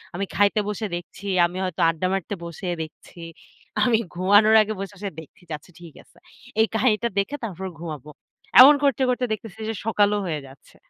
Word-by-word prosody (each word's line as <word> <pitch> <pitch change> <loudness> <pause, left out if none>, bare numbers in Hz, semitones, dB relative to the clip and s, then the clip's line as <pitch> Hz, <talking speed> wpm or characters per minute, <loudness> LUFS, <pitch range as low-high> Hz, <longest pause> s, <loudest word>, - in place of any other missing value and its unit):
আমি 200 +2 -2
খাইতে 205 +1 +3
বসে 210 +1 -3
দেখছি, 175 +3 -9 0.2
আমি 175 +2 -5
হয়তো 185 -3 -3
আড্ডা 165 +3 -1
মারতে 195 +1 -3
বসে, 170 +2 -7
দেখছি। 160 +2 -11 0.6
আমি 240 -3 +3 0.2
ঘুমানোর 205 +5 +5
আগে 215 +1 -1
বসে, 195 +1 -6
বসে 200 0 -4
দেখছি, 160 +4 -15 0.2
আচ্ছা 180 - -21
ঠিক 170 -3 -12
আছে। - - -28 0.4
এই 220 - +5
কাহিনীটা 225 0 +1
দেখে, 265 +9 -2
তারপর 190 -3 -5
ঘুমাবো। 150 -4 -7 0.5
এমন 285 +3 +10
করতে 275 -1 +2
করতে 250 0 0
দেখতেছি 220 0 -6
যে, - - -1
সকালও 210 -2 +2
হয়ে 155 -4 -2
যাচ্ছে। 135 +1 -18
200 Hz, 175 wpm, -23 LUFS, 175-220 Hz, 0.6 s, এমন